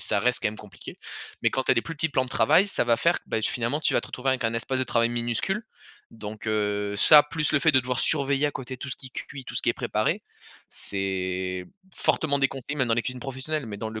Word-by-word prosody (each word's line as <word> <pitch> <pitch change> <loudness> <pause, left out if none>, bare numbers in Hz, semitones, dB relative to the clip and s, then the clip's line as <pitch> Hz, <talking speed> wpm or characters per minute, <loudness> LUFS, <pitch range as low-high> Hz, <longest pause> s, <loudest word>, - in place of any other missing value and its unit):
ça 100 - +1
reste 125 +2 +1
quand - - +1
même 105 - -8
compliqué. 105 - -12 0.5
Mais - - +3
quand 130 -1 -2
tu - - 0
as - - 0
des 115 - 0
plus 165 - -7
petits 160 +2 -1
plans 130 -2 0
de 125 - -12
travail, 150 - +3
ça 190 - -1
va 120 -1 +2
faire 170 +1 +1
que, - - -35
bah, 110 - -2
finalement 120 +7 -1
tu - - 0
vas - - +3
te - - -9
retrouver 135 +1 -2
avec 130 -2 -2
un 115 +1 0
espace 130 +3 -2
de 130 - 0
travail 115 -1 +1
minuscule, 120 - -2 0.5
donc, 110 0 -9
heu, 105 -1 -1
ça 150 +8 +12
plus 150 0 -3
le 140 - +3
fait 160 - +4
de 130 - +4
devoir 125 0 -3
surveiller 140 -1 +1
à - - -1
côté 130 -2 -7
tout 140 - -8
ce - - -5
qui 130 -1 -12
cuit, 135 0 -9
tout - - -10
ce - - -1
qui - - -1
est - - +4
préparé, - - -2 0.5
c'est 95 -1 -3 0.3
fortement 140 -3 0
déconseillé, 135 +1 -2
même 130 -4 0
dans 115 - +2
les 120 - -1
cuisines 125 -1 -6
professionnelles. 135 +2 -5
Mais 105 -2 -7
dans 110 +1 -6
le 110 - -7
125 Hz, 265 wpm, -25 LUFS, 110-140 Hz, 0.5 s, ça